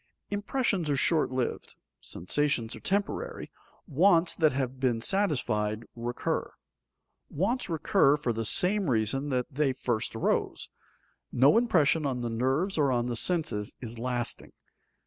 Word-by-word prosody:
_ - - -2
Impressions 205 - -1
are 145 - +2
short 155 +3 +2
lived, 130 -1 -3 0.2
sensations 115 - -1
are - - -10
temporary, 330 - -3 0.3
wants 170 +2 +3
that 155 -2 +3
have 130 -1 -3
been 125 -3 +1
satisfied 115 - 0
recur. 120 +1 -3 0.8
Wants 205 - -1
recur 150 -3 +3
for 125 -5 -2
the 115 +1 -3
same 185 - +3
reason 125 +5 0
that 125 -2 0
they 140 -1 +1
first 120 -3 -2
arose. 110 - -1 0.6
No 135 - +5
impression 165 -10 +3
on 125 -2 -2
the 120 -1 -3
nerves 135 - 0
or 140 -3 +3
on 120 -1 0
the 120 -1 -2
senses 150 - -1
is 115 -2 -8
lasting. 120 -1 -3
135 Hz, 140 wpm, -28 LUFS, 120-170 Hz, 0.8 s, No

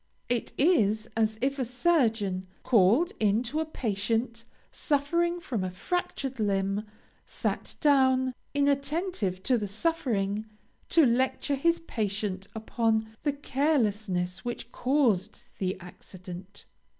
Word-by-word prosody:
It 240 -1 0
is 220 - +3
as 220 -1 +1
if 275 +1 0
a - - +2
surgeon, 225 - +1 0.2
called 230 - +4
in 215 +2 +3
to 275 +6 -2
a 320 - 0
patient 230 -2 -2 0.3
suffering 340 +4 0
from 235 - -3
a 185 - -1
fractured 270 - -3
limb, 200 0 0 0.4
sat - - -3
down, 260 -3 +4 0.2
inattentive 280 - 0
to 250 -3 +2
the 205 - -3
suffering, 215 - -1 0.4
to 325 -3 +6
lecture 260 +3 +1
his 335 +5 +2
patient 205 - -3
upon 220 0 0
the 290 -2 0
carelessness 215 - 0
which 240 0 -5
caused 240 -7 +1 0.2
the 185 -1 -1
accident. 185 +1 -10
230 Hz, 115 wpm, -28 LUFS, 200-280 Hz, 0.4 s, to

